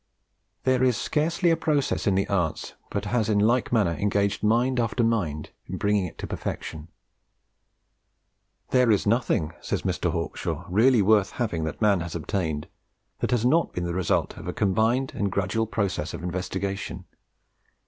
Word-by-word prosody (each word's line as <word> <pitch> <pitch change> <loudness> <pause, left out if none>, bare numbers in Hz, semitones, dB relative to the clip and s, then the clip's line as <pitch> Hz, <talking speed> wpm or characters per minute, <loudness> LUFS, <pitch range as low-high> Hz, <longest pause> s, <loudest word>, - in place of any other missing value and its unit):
There 130 -1 +2
is 125 -4 +3
scarcely 170 +3 +1
a - - +4
process 145 -7 0
in 100 - +3
the 95 - +1
arts 85 -6 -1 0.2
but - - -3
has 115 -3 0
in 105 - +3
like 115 +5 +2
manner 105 -8 +3
engaged 100 +2 0
mind 120 +4 +2
after 120 +1 +1
mind 95 -10 -1 0.2
in - - -4
bringing 100 -2 +1
it - - -13
to - - -5
perfection. 80 0 -5 1.8
"There 125 -2 +4
is 105 -3 +3
nothing," 105 -8 +1
says - - -2
Mr. - - 0
Hawkshaw, - - -3
"really 110 +4 +4
worth 105 -1 +3
having 95 -10 -2
that 80 - -4
man 100 -3 +4
has 85 0 -5
obtained, 80 -3 -2 0.5
that - - -1
has 120 -1 +1
not 165 +6 +3
been 90 - -2
the 85 - -2
result 90 -2 0
of - - -8
a - - -2
combined 110 +7 +1
and 100 -2 -1
gradual 110 +4 0
process 95 -7 -2
of - - -8
investigation. 95 +2 -3
105 Hz, 165 wpm, -26 LUFS, 90-120 Hz, 1.8 s, a